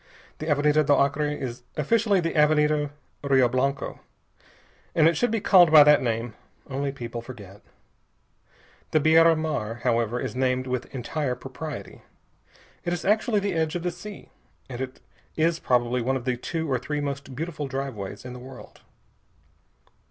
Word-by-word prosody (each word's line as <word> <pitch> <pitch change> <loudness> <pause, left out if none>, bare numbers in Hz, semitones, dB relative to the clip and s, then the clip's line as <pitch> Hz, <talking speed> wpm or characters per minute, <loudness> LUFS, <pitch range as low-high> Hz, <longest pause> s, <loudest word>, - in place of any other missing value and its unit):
The 155 - -5
Avenida 150 +1 +3
do 145 0 +3
Acre 140 +2 +1
is 130 -5 -5 0.2
officially 205 +6 +2
the 165 -1 -1
Avenida 150 -1 +3 0.3
Rio 135 -3 +4
Blanco, 135 +3 -1 1.0
and 160 -1 +5
it 165 - +3
should 245 - +1
be 225 0 0
called 180 -5 +6
by 155 -2 +10
that 150 0 +5
name, 115 -1 -2 0.3
only 140 0 -2
people 120 -3 -6
forget. 105 -5 -11 1.3
The 155 - +3
Beira 165 +2 +5
Mar, 120 -8 -3
however, 120 -1 +1
is - - -4
named 130 0 0
with 125 0 -3
entire 135 +1 -3
propriety. 140 +4 -8 0.8
It 175 - -1
is 175 - -4
actually 210 +1 +2
the 200 -1 -1
edge 160 -1 -1
of 175 - -3
the 180 - -1
sea, 195 +4 -11 0.4
and 125 -1 -6
it 130 0 -6 0.4
is 165 +1 +2
probably 125 -2 +1
one 130 +3 0
of 125 -2 -4
the 125 -1 0
two 160 +6 -4
or 125 - +1
three 150 +4 -3
most 140 -2 -5
beautiful 150 0 -4
driveways 130 -7 -5
in 125 - -7
the 125 - -9
world. 130 +2 -12
140 Hz, 160 wpm, -25 LUFS, 125-160 Hz, 1.3 s, by